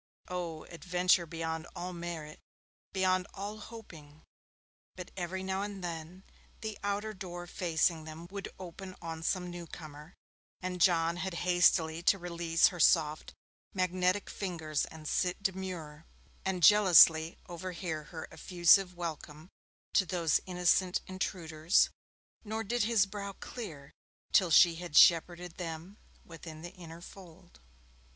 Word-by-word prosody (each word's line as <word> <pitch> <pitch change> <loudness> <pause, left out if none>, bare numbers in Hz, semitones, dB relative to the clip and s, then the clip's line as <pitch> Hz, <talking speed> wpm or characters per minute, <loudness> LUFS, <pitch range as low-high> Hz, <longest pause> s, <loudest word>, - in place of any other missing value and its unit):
Oh, 170 -3 -4
adventure 180 0 +1
beyond 160 0 -4
all 180 +1 -5
merit, 170 -3 -6 0.5
beyond 185 -1 +1
all 205 +2 -6
hoping! 165 -10 -12 0.7
But 180 -1 -9
every 185 +1 -4
now 190 0 -2
and 200 -2 -5
then, 170 +2 -6 0.4
the 220 -2 -4
outer 205 +2 -2
door 175 -3 -7
facing 165 -2 0
them 160 +2 -9
would 200 0 -6
open 185 +1 -9
on 165 -1 -6
some 180 +1 -1
newcomer, 160 -2 -10 0.4
and 180 -1 -4
John 170 -1 +3
had 185 0 -3
hastily 175 -2 +3
to 195 +3 +4
release 170 -2 +2
her 180 - -9
soft 155 -2 +3 0.4
magnetic 185 +1 +1
fingers 160 -6 -2
and 155 -1 -10
sit 180 +4 -1
demure, 180 -5 -4 0.4
and 185 -2 -2
jealously 170 -5 +7
overhear 170 -3 -5
her 165 0 -8
effusive 180 +1 +3
welcome 160 -1 -6 0.4
to 190 - +3
those 170 -4 +2
innocent 180 0 +2
intruders, 170 -3 +1 0.5
nor 220 +1 -3
did 235 +1 0
his 220 -4 +3
brow 200 0 -6
clear 160 - -8 0.4
till 185 -3 +4
she 165 +1 +6
had 175 -3 -3
shepherded 175 +1 +5
them 170 +3 -7 0.3
within 165 -1 -10
the 175 - -8
inner 170 -2 -11
fold. 180 - -14
175 Hz, 130 wpm, -31 LUFS, 165-190 Hz, 0.7 s, jealously